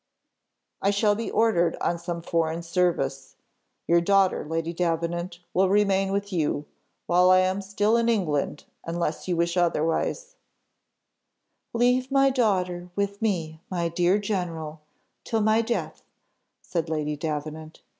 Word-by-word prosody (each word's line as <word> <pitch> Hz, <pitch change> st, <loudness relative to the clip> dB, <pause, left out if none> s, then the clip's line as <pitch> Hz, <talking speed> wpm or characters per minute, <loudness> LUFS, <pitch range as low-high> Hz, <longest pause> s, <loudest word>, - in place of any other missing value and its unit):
"I 195 Hz, -, +2 dB
shall 205 Hz, +1 st, +3 dB
be 225 Hz, +2 st, -3 dB
ordered 175 Hz, -7 st, +2 dB
on 170 Hz, -, -1 dB
some 170 Hz, -1 st, -5 dB
foreign 165 Hz, 0 st, -1 dB
service. 165 Hz, -6 st, -1 dB, 0.5 s
Your 170 Hz, 0 st, +4 dB
daughter, 195 Hz, +1 st, +3 dB
Lady 165 Hz, +2 st, -3 dB
Davenant, 170 Hz, +1 st, -2 dB, 0.2 s
will 190 Hz, +1 st, +3 dB
remain 195 Hz, -1 st, +2 dB
with 200 Hz, 0 st, -2 dB
you, 150 Hz, -3 st, 0 dB, 0.4 s
while 180 Hz, +1 st, +4 dB
I 185 Hz, 0 st, +6 dB
am 185 Hz, +2 st, 0 dB
still 205 Hz, +3 st, +1 dB
in 235 Hz, 0 st, +2 dB
England, 155 Hz, -10 st, 0 dB, 0.2 s
unless 170 Hz, -1 st, -3 dB
you 175 Hz, -2 st, 0 dB
wish 170 Hz, +1 st, +1 dB
otherwise 175 Hz, -, 0 dB, 0.6 s
" -, -, -53 dB
"Leave 250 Hz, +2 st, +2 dB
my 275 Hz, 0 st, +4 dB
daughter 185 Hz, -8 st, 0 dB
with 200 Hz, +1 st, -2 dB
me, 165 Hz, -7 st, -2 dB
my 170 Hz, -2 st, -1 dB
dear 175 Hz, +3 st, +2 dB
general, 170 Hz, -7 st, -3 dB, 0.4 s
till 225 Hz, -2 st, -1 dB
my 215 Hz, +1 st, +3 dB
death," 235 Hz, +1 st, -3 dB, 0.6 s
said 170 Hz, -2 st, -3 dB
Lady 150 Hz, -1 st, -1 dB
Davenant. 155 Hz, +1 st, -5 dB
180 Hz, 135 wpm, -25 LUFS, 165-200 Hz, 0.6 s, I